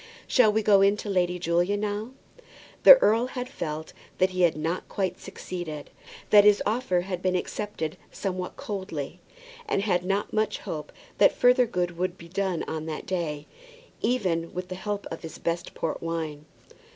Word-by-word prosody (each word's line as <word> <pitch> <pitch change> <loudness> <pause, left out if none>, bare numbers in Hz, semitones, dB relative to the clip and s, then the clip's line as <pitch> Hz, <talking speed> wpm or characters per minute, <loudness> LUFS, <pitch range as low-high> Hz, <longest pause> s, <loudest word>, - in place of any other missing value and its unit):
Shall 245 -5 +4
we 220 +1 +1
go 200 -2 +5
in 200 +1 +4
to 210 - -6
Lady 180 -1 +1
Julia 175 +3 +1
now?" 210 +2 -3 0.7
The - - +12
earl 230 +3 +3
had 250 -1 -5
felt 155 - -5 0.2
that 185 0 +3
he 185 0 -2
had 170 -3 +3
not 165 +4 -3
quite 185 -2 -2
succeeded; 160 -5 -7 0.4
that 205 -1 +9
his 205 0 +6
offer 215 -4 +1
had 180 -1 -4
been 185 0 +1
accepted 180 -4 -3
somewhat 185 -2 -4
coldly, 180 -6 -5 0.5
and 200 - 0
had 180 -4 +1
not 195 +2 -1
much 215 -1 +1
hope 150 -1 -6 0.3
that - - +6
further 250 0 +5
good 175 -5 -2
could 185 +1 -2
be 170 - -12
done 190 -2 -1
on 160 0 -5
that 155 -1 -5
day, 160 -5 -3 0.6
even 180 -9 0
with 180 0 -4
the - - -4
help 205 +2 -4
of 165 - -6
his 165 - -8
best 170 +1 -3
port 160 - -3
wine. 160 -3 -4
185 Hz, 175 wpm, -26 LUFS, 165-205 Hz, 0.7 s, The